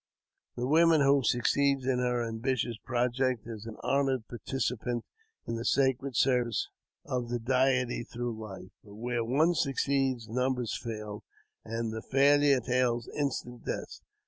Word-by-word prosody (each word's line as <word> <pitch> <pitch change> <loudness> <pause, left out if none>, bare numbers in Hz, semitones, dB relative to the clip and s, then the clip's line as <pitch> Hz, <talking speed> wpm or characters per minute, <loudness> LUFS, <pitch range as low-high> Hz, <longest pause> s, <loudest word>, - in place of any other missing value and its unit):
The 120 - -2
woman 160 +2 +5
who 140 0 +5
succeeds 135 +3 +2
in 130 -1 +1
her 125 -1 0
ambitioi 120 +1 -1
project 125 0 0
is 110 -1 -7
an 110 - -8
honoured 135 -4 +1
participant 120 -1 -3 0.4
in 115 - -3
the 115 - -4
sacred 135 0 +1
service 125 -4 +2 0.4
of 125 -1 -2
thj 120 -1 -4
Deity 130 -1 +2
through 120 0 -4
hfe; 100 -4 -9
but 100 -1 -13
where 120 +1 -2
one 150 +9 +3
succeeds 135 -5 0
numbers 125 0 -1
fail, 105 -3 -6 0.4
an< 115 0 -3
the 110 0 -5
failure 140 +2 +4
entails 125 -1 0
instant 125 -4 -3
death. - - -5
125 Hz, 140 wpm, -30 LUFS, 115-135 Hz, 0.4 s, woman